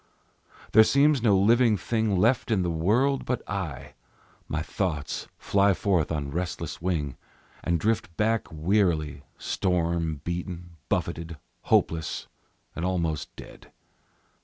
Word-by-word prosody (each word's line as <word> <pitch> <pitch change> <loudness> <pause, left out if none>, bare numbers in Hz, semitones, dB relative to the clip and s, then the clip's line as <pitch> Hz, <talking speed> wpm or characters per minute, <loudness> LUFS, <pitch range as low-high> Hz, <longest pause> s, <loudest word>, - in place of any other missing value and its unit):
There 110 - +8
seems 140 +2 +4
no 105 -4 +4
living 115 +2 +4
thing 110 -2 0
Left 115 +6 +2
in 105 -5 +2
the 85 - 0
world 115 +12 +2
but 125 - -3
I; 70 -8 -5 0.5
My 80 0 -2
thoughts 80 -5 -3
fly 100 -1 +2
forth 90 -6 +1
on 75 -3 -2
restless 85 -1 -4
wing, 80 -7 -2 0.5
And 85 -1 +1
drift 105 -5 -1
back 110 +1 +1
wearily, 80 -3 +1 0.2
Storm 85 -4 -1
beaten, 85 0 -5
buffeted, 80 -1 -2 0.3
hopeless, 80 -2 +1 0.5
and 80 - -4
almost 85 -5 -2
dead. - - -13
90 Hz, 120 wpm, -26 LUFS, 80-105 Hz, 0.5 s, There